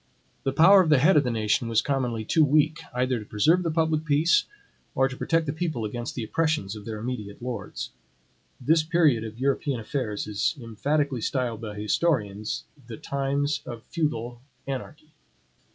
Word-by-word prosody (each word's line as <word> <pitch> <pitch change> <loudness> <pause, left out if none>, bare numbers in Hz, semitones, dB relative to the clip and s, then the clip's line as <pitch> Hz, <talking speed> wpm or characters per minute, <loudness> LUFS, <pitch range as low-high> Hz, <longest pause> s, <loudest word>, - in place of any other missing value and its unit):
The 135 - +2
power 180 +8 +7
of 170 - 0
the 150 - +6
head 155 +8 +5
of 150 - +5
the 125 - -1
nation 115 +3 0
was 115 -1 +2
commonly 125 -5 -1
too 160 +7 +3
weak, 150 +2 +3
either 125 0 0
to 105 - -9
preserve 155 - +3
the 170 - -1
public 160 -1 +1
peace, 155 +2 +3 0.5
or 135 +1 +3
to 135 - -7
protect 165 +4 0
the 145 - -2
people 160 -8 -2
against 120 +3 -5
the 120 - -3
oppressions 150 -6 -1
of 105 -1 -10
their 110 -1 -5
immediate 105 -3 -5
lords. 120 -5 -5 0.7
This 155 +6 +3
period 155 -7 +2
of 110 0 -7
European 135 0 0
affairs 110 -2 -3
is 105 +8 -1
emphatically 130 +3 -1
styled 120 -2 -2
by 105 -2 -6
historians, 105 -2 -1 0.2
the 115 -2 -7
times 140 +1 -1
of 120 -2 -7
feudal 120 -8 -3 0.2
anarchy. 150 +3 -6
130 Hz, 170 wpm, -26 LUFS, 115-155 Hz, 0.7 s, power